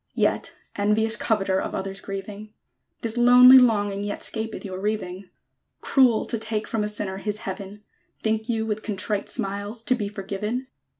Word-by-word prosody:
_ - - -54
Yet, - - 0 0.2
envious 215 +2 +2
coveter 195 -5 0
Of - - -4
other's 195 0 -4
grieving! 205 +2 -7 0.5
This 230 0 -3
lonely 250 +2 +9
longing 205 -5 +2
yet 205 0 -4
'Scapeth 220 -1 -4
your 185 -1 -5
reaving. 195 -2 -3 0.5
Cruel 255 -5 +3
to 230 - -3
take 220 -1 -2
from 225 -2 -1
a 210 - -2
Sinner 205 -2 -3
his 210 +1 -3
Heaven! 195 +2 -7 0.4
Think 220 +1 -1
you 225 -1 0
with 215 -1 -2
contrite 205 -1 -2
smiles 205 +3 -4
To 255 - +2
be 215 -5 -2
forgiven? 210 +5 -4
210 Hz, 165 wpm, -24 LUFS, 200-225 Hz, 0.5 s, lonely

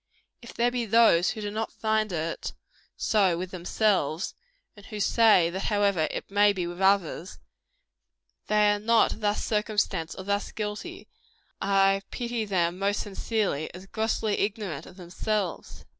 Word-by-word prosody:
If 235 - -12
there 240 +1 +2
be 240 -2 -2
those 215 -5 +5
who 215 - -4
do 205 -1 -3
not 220 +1 -3
find 220 -1 0
it 165 -1 -3 0.4
so 195 -6 +2
with 185 +1 -5
themselves, 180 -2 0 0.4
and 205 -1 -15
who 210 - -6
say 205 -6 +4
that 190 +2 -4
however 200 -6 +2
it - - -6
may 205 0 +4
be 180 -3 -2
with 175 +2 -6
others, 190 -2 +1 1.1
they 210 -1 +4
are 205 - 0
not 225 +1 +2
thus 210 0 0
circumstanced 205 -6 -1
or 190 - -6
thus 200 +1 -2
guilty, 210 -1 -6 0.5
I 195 0 +3
pity 235 -2 -3
them 180 -3 0
most 200 +1 0
sincerely, 200 -6 -2
as 185 +1 -10
grossly 220 0 -1
ignorant 200 -8 -3
of - - -14
themselves. 185 +1 -4
205 Hz, 150 wpm, -27 LUFS, 185-215 Hz, 1.1 s, those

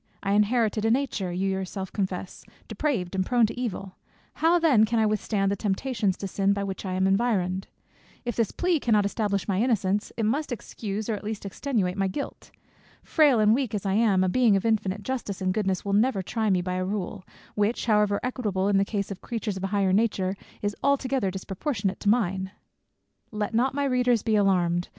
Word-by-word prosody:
I 195 - 0
inherited 215 +1 +2
a 225 - +2
nature, 230 -7 0
you 190 +2 -1
yourself 190 0 -4
confess, 190 -2 -4 0.2
depraved, 225 -13 -2
and 190 -1 +1
prone 240 +3 +3
to 225 - -4
evil: 195 -6 -4 0.4
how 330 +2 +3
then 300 -10 +4
can 230 +2 +1
I 220 - +3
withstand 210 -2 0
the - - +1
temptations 205 0 -1
to 195 - -4
sin 195 +1 +1
by 200 0 -2
which 195 0 -5
I 185 - -2
am 190 +1 +1
environed? 195 -2 +1 0.6
If 240 - -2
this 230 -3 0
plea 355 -3 +1
cannot 215 -6 +2
establish 200 -2 -1
my 195 0 +1
innocence, 205 -4 0
it 225 - -1
must 280 +7 0
excuse 215 -2 -5
or 225 - 0
at 210 - -5
least 210 -1 -5
extenuate 200 -3 -1
my 195 -1 +1
guilt. 235 +10 -6 0.5
Frail 290 -7 +4
and 215 0 +5
weak 245 -3 0
as 205 - -4
I 195 - +1
am, 205 -3 +3
a - - +2
Being 230 +1 +4
of 195 +2 0
infinite 210 -3 0
justice 235 -5 -3
and 185 -1 0
goodness 195 -3 -1
will 200 - -1
never 210 -1 +2
try 220 +3 -1
me 185 -2 +2
by 180 0 -2
a 185 - -1
rule, 195 0 -4 0.3
which 210 +3 0
however 210 -2 +3
equitable 210 -7 -1
in 200 -1 +3
the - - +4
case 200 -1 -3
of 195 - -7
creatures 225 -4 -3
of 190 - -6
a - - +1
higher 195 -1 +1
nature, 195 -3 +1 0.3
is 205 0 -1
altogether 265 -6 +1
disproportionate 195 - -3
to 205 - 0
mine." 195 -4 +1 0.8
Let 210 0 -3
not 260 +4 +1
my 285 - 0
readers 250 -3 +2
be 220 -1 +1
alarmed! 180 -4 +2
205 Hz, 205 wpm, -26 LUFS, 190-230 Hz, 0.8 s, and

